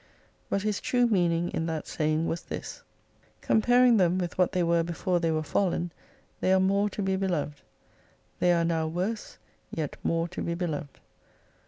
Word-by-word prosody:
But 200 - 0
his 210 -1 -1
true 245 -1 +2
meaning 175 -6 +1
in 160 - -2
that 160 -2 -3
saying 155 +1 0
was 170 +1 -2
this: - - -7 0.6
Comparing 245 +2 +4
them 180 -2 +3
with 175 -2 -2
what 180 -1 +2
they 180 - +1
were 170 0 +3
before 175 +2 -1
they 165 -1 0
were 155 -1 0
fallen, 175 +1 0 0.5
they 185 - +1
are 190 - +5
more 200 +2 +2
to 205 - -4
be 190 0 +1
beloved. 175 -6 -2 0.8
They 180 - +4
are 170 -1 +3
now 165 -1 0
worse, 185 +7 -3 0.3
yet 155 -3 -4
more 165 0 0
to 180 - -6
be 170 - -2
beloved. 155 -5 -4
175 Hz, 175 wpm, -28 LUFS, 165-190 Hz, 0.8 s, are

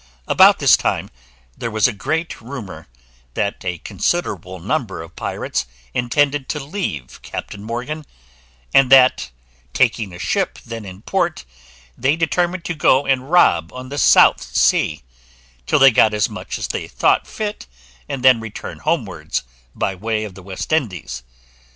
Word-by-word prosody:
About - - +6
this - - +6
time - - -2 0.4
there 115 - -4
was 110 0 +3
a 120 - -3
great 160 +10 -3
rumour, 110 - -8 0.5
that 100 - -2
a 90 -2 -2
considerable 95 - -2
number 115 - -2
of 80 +1 -14
pirates - - -3 0.3
intended 140 +3 +1
to 150 - -2
leave 135 - -5
Captain 100 - -7
Morgan; 125 +7 -5 0.7
and 135 -1 +5
that, 130 - +6 0.4
taking 115 -5 +1
a 85 - -9
ship 90 - -1
then 115 -2 -7
in 95 +2 -10
port, 175 - -1 0.5
they 135 +5 +1
determined 175 +2 0
to 175 - -2
go 140 -3 +3
and 135 0 0
rob 85 - +4
on 130 0 -8
the 145 +1 -4
South - - +6
Sea, 75 -4 +1 0.6
till - - +3
they 135 -1 +8
had - - -3
got 110 - +5
as 105 - +2
much - - -6
as - - -4
they - - -3
thought - - +1
fit, 210 - -5 0.4
and 130 - -4
then 130 -3 +7
return 115 -1 -8
homewards, 95 - -2 0.3
by 95 - -1
way 110 +3 -2
of 105 -3 -7
the 95 0 -13
East 95 - -4
Indies. 95 - -2
120 Hz, 155 wpm, -20 LUFS, 95-145 Hz, 0.7 s, they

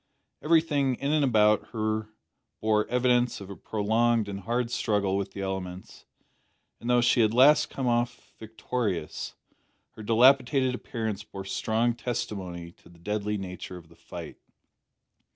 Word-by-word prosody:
Everything 150 -5 +2
in 140 +4 -2
and 155 -1 +3
about 105 -5 +3
her 110 -1 -1 0.5
bore 105 -1 +1
evidence 125 0 +2
of 100 -1 -9
a - - -7
prolonged 110 +2 +1
and 100 -1 -5
hard 115 +4 -2
struggle 100 -5 0
with 100 0 -3
the 100 - -6
elements, 95 -1 -6 0.7
and 120 - -5
though 125 0 +4
she 120 0 +4
had 110 - +4
at 115 - -4
last 145 +4 +6
come 135 - -4
off 120 0 -1
victorious, 110 -6 -4 0.6
her - - -12
dilapidated 130 +3 +4
appearance 110 -4 -4
bore 95 -2 -9
strong 110 +4 0
testimony 100 -8 -5
to - - -21
the 85 - -18
deadly 105 +3 -2
nature 90 -1 -7
of 85 -2 -14
the - - -18
fight. - - -9
110 Hz, 150 wpm, -27 LUFS, 100-125 Hz, 0.7 s, last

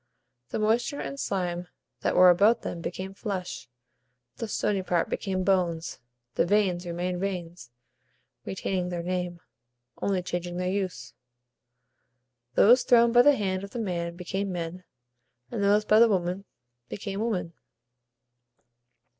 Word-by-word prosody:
The - - -3
moisture 230 +6 +1
and 275 - -5
slime 180 -4 -2 0.3
that - - 0
were 180 0 +8
about 205 +6 +4
them 170 - -5
became 185 +3 -5
flesh; 190 - -5 0.7
the 230 - -4
stony 205 -1 0
part 175 -2 0
became 190 -2 -1
bones; 175 -4 0 0.3
the - - +2
veins 180 -2 +1
remained 175 +1 -2
veins, 175 -8 -4 0.7
retaining 180 - -2
their 175 -1 -3
name, 180 -1 -3 0.6
only 190 -2 0
changing 175 0 -4
their 180 0 -1
use. 190 -2 -3 1.4
Those 245 +5 +7
thrown 235 -1 +5
by 240 +1 +7
the 290 +3 +6
hand 190 -4 -2
of 200 - -7
the 235 - -6
man 170 -5 -3
became 190 +2 -3
men, 175 +1 -5 0.7
and 200 - -2
those 205 +1 +3
by 215 +1 +5
the 230 0 +7
woman 185 0 -1 0.4
became 200 -1 -5
women. 205 -7 -2
185 Hz, 135 wpm, -27 LUFS, 175-205 Hz, 1.4 s, were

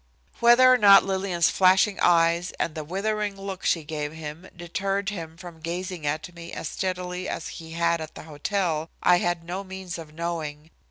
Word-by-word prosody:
Whether 245 +2 +7
or 250 - +3
not 200 -2 +8
Lillian's 190 -3 +1
flashing 190 +2 +4
eyes 170 +1 +3
and 160 - -1
the 155 - -5
withering 200 +4 -2
look 195 -1 -6
she 165 - +1
gave 150 -1 -4
him 160 +3 -8
deterred 195 +3 -2
him 165 -5 -7
from 170 -1 -11
gazing 175 -1 -4
at 155 +4 -3
me 170 0 -10
as 160 - -4
steadily 180 -1 -3
as - - -4
he 160 -1 -10
had 170 0 +1
at 155 - -8
the - - -9
hotel 160 +1 -2
I 180 0 +5
had 175 -1 -1
no 180 +3 -5
means 190 -2 -7
of 160 -2 -10
knowing. 160 -2 -5
175 Hz, 180 wpm, -25 LUFS, 160-190 Hz, -, not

